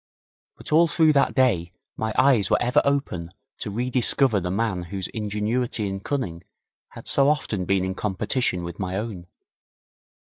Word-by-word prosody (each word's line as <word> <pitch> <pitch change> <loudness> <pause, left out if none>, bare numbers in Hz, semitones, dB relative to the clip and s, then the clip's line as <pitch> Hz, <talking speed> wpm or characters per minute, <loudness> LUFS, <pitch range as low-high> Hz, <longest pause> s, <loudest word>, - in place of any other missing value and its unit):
But - - -10
all 165 +2 +5
through 160 -1 +4
that 140 - +2
day 95 -11 +2 0.2
my 110 0 -2
eyes 130 -7 +4
were - - +3
ever 125 +5 +3
open 135 -12 -1 0.3
to - - -4
re 120 +5 -3
discover 125 -2 +4
the 90 -1 -3
man 95 -1 -1
whose 95 +1 -4
ingenuity 105 +1 -2
and 95 0 -5
cunning 90 -12 -3 0.5
had - - -10
so 140 0 +3
often 105 -11 -1
been 95 0 +1
in 95 - -2
competition 95 0 -1
with 85 0 -7
my 95 -1 -3
own. 100 -5 -5
105 Hz, 165 wpm, -24 LUFS, 95-130 Hz, 0.5 s, all